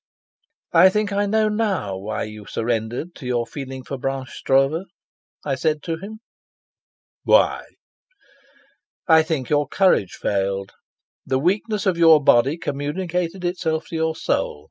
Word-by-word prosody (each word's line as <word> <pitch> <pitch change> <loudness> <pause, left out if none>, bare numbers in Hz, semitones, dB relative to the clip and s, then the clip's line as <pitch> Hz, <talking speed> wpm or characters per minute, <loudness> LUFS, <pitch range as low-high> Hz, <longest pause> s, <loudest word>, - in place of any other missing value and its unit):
"I 180 +3 +7
think 205 +1 -1
I 205 +1 +1
know 215 +1 +2
now 210 - -1
why 100 +3 -4
you 105 -1 -9
surrendered 115 +8 -3
to 130 - -8
your 120 -2 0
feeling 130 +1 -7
for 135 +1 -6
Blanche 135 0 -3
Stroeve," 135 +7 +1 0.6
I 140 - 0
said 150 +3 -1
to 165 -1 -3
him. 215 +5 -9 1.0
"Why?" - - +3 1.4
"I 160 -2 +7
think 155 -5 -3
your 145 -1 +2
courage 180 - +2
failed. 100 -1 -2 0.5
The 130 - 0
weakness 200 +7 0
of 180 -3 +1
your 165 -2 +7
body 135 +2 +3
communicated 170 +5 -3
itself 165 -3 -2
to - - -6
your 160 0 0
soul. 75 - -1
155 Hz, 140 wpm, -22 LUFS, 130-180 Hz, 1.4 s, I